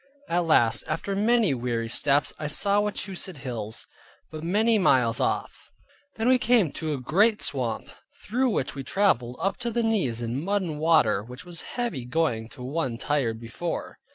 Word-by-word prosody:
At 175 Hz, 0 st, 0 dB
last, 120 Hz, -7 st, +4 dB
after 165 Hz, +5 st, -2 dB
many 215 Hz, -, +3 dB
weary 120 Hz, -2 st, -2 dB
steps, 140 Hz, +4 st, +1 dB
I 150 Hz, -, -3 dB
saw 200 Hz, +7 st, +3 dB
Wachusett 195 Hz, -4 st, -4 dB
hills, 115 Hz, -5 st, -4 dB, 0.5 s
but 155 Hz, 0 st, -7 dB
many 215 Hz, +6 st, +3 dB
miles 125 Hz, -, +3 dB
off. -, -, -2 dB, 0.5 s
Then 225 Hz, +1 st, -1 dB
we 255 Hz, 0 st, +5 dB
came 225 Hz, -, +3 dB
to 155 Hz, +1 st, -3 dB
a -, -, -5 dB
great 205 Hz, -, +3 dB
swamp, 125 Hz, -5 st, 0 dB, 0.4 s
through 255 Hz, +5 st, +1 dB
which 140 Hz, -, -1 dB
we 135 Hz, -, -6 dB
traveled, 125 Hz, -, +1 dB
up 195 Hz, -, -1 dB
to 240 Hz, -1 st, -3 dB
the 235 Hz, 0 st, 0 dB
knees 190 Hz, -, 0 dB
in 120 Hz, +4 st, -3 dB
mud 200 Hz, +1 st, 0 dB
and 155 Hz, -4 st, -4 dB
water, 155 Hz, -11 st, +3 dB
which 125 Hz, +7 st, -11 dB
was 175 Hz, -2 st, -5 dB, 0.2 s
heavy 235 Hz, -, -2 dB
going 125 Hz, -5 st, -1 dB
to 125 Hz, -, -10 dB
one 130 Hz, -3 st, -2 dB
tired 125 Hz, -5 st, -1 dB
before. 120 Hz, +9 st, -5 dB
155 Hz, 175 wpm, -26 LUFS, 125-200 Hz, 0.5 s, we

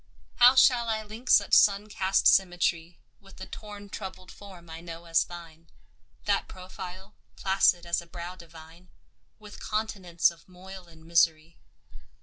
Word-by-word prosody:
How 250 Hz, +2 st, +7 dB
shall 245 Hz, -3 st, +4 dB
I 220 Hz, -1 st, -2 dB
link 220 Hz, +4 st, -10 dB
such 200 Hz, -, +4 dB
sun 205 Hz, 0 st, +5 dB
cast 195 Hz, -2 st, 0 dB
symmetry 175 Hz, -2 st, +2 dB, 0.2 s
With 195 Hz, -1 st, -18 dB
the 190 Hz, -, -8 dB
torn 205 Hz, 0 st, -10 dB
troubled 190 Hz, -2 st, -9 dB
form 185 Hz, -4 st, -14 dB
I 165 Hz, 0 st, -9 dB
know 170 Hz, 0 st, -10 dB
as 165 Hz, -1 st, +2 dB
thine, 165 Hz, -2 st, -13 dB, 0.6 s
That -, -, 0 dB
profile, 185 Hz, +1 st, -10 dB, 0.2 s
placid 190 Hz, -2 st, +2 dB
as 170 Hz, 0 st, -1 dB
a 170 Hz, -, -16 dB
brow 175 Hz, +1 st, -8 dB
divine, 165 Hz, 0 st, -15 dB, 0.5 s
With 210 Hz, -1 st, -13 dB
continents 195 Hz, -6 st, -1 dB
of 170 Hz, +2 st, -19 dB
moil 185 Hz, 0 st, -12 dB
and 160 Hz, -1 st, -18 dB
misery? 165 Hz, -1 st, +1 dB
185 Hz, 145 wpm, -27 LUFS, 170-200 Hz, 0.6 s, How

